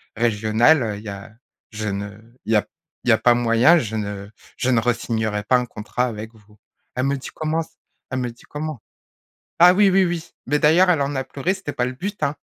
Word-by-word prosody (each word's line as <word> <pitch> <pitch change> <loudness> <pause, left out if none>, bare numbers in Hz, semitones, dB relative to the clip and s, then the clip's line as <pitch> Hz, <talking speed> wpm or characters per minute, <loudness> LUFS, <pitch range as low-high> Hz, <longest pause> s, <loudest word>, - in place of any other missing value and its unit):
régional, 115 +5 +3
heu. 105 -3 -3
Il 105 - -11
y 105 - -6
a 100 +2 -9 0.4
je 110 0 -4
ne, 100 +1 -5 0.3
il 110 - 0
y - - +5
a 105 - 0 0.4
il - - -1
y - - +7
a 110 - +4
pas 120 - +4
moyen, 120 +7 +4
je 110 -8 -2
ne 100 -1 -4 0.3
je 130 - 0
ne 120 - +4
re-signerai 110 -3 -1
pas 125 +4 +3
un 125 - -1
contrat 120 +2 -3
avec 110 -1 -7
vous». 105 0 -22 0.4
Elle 130 +1 0
me 140 - +1
dit: 130 - -8
«Comment 160 +1 -1
c». - - -19 0.4
Elle 130 - -1
me 125 -1 -2
dit: 120 - -19
«Comment?» 150 -4 -5 0.8
Ah 180 +1 +8
oui, 205 +1 +5
oui, 190 0 +4
oui, 170 -1 -4 0.2
mais 150 +2 +1
d'ailleurs 170 +6 +5
elle 165 -5 +3
en 140 +1 -1
a 135 - -1
pleuré, 160 +9 -2
ce 190 - -9
n'était 145 - -4
pas 125 - 0
le 130 - -3
but, 200 +10 -6
hein. 145 +2 0
125 Hz, 240 wpm, -22 LUFS, 110-155 Hz, 0.8 s, Ah